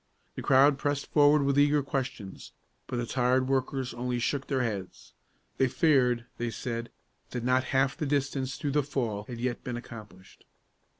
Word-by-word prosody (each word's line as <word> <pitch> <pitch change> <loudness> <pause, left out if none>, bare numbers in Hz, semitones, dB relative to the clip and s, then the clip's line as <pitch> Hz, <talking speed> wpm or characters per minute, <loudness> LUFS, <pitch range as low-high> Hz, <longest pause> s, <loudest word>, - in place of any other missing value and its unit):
The - - -6
crowd 140 +1 +5
pressed 145 -1 -2
forward 145 0 +5
with 140 0 +2
eager 145 0 +4
questions, 130 -8 -5 0.3
but 125 - -3
the 120 - -1
tired 130 +1 +1
workers 130 -1 -1
only 125 +1 -2
shook 135 +3 -1
their 135 -3 0
heads. 100 -5 -5 0.4
They 130 - +3
feared, 125 -5 +2
they 120 0 -1
said, 115 +1 -4 0.4
that 125 -2 -4
not 130 +1 +2
half 135 0 +1
the 150 - -2
distance 135 -2 -1
through 145 -3 -2
the 150 +1 +3
fall 120 -7 -3
had 120 0 -7
yet 120 0 -2
been 125 -1 -4
accomplished. 105 -6 -12
130 Hz, 170 wpm, -29 LUFS, 120-140 Hz, 0.4 s, crowd